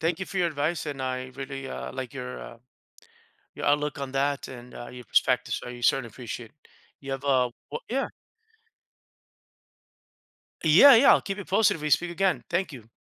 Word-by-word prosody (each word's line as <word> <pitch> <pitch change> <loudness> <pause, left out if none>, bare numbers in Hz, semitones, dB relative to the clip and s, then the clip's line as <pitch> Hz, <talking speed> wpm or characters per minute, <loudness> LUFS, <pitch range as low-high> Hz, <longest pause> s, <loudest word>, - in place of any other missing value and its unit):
Thank 165 +2 0
you 190 - -3
for 195 - -4
your 175 - +3
advice, 155 +1 -1
and 140 -3 -4
I 130 0 -2
really, 135 0 -6
uh, - - -6
like 130 -2 -5
your, 125 -1 -6
uh 120 - -10 1.0
your - - -5
outlook 145 0 +1
on 135 -1 -5
that 140 +1 0
and, 125 -1 -10
uh, 120 - -8
your 125 -1 -10
perspectives, - - +2
so, 125 - -7
certainly 130 0 +2
appreciate 115 0 -8
it. 150 - -28 0.3
You 135 -1 -7
have 135 - -4
a 130 -3 +3 0.2
wo - - -3
Yeah. 270 +2 0 2.6
Yeah, 180 - +9
yeah, 255 +5 +7
I'll - - +3
keep 195 0 -4
you 200 - -7
posted 205 +3 +3
if 160 - -9
we 150 - -2
speak 175 +3 +2
again. 185 +2 +1
Thank 175 0 0
you. 115 -4 -12
140 Hz, 190 wpm, -27 LUFS, 130-170 Hz, 2.6 s, Yeah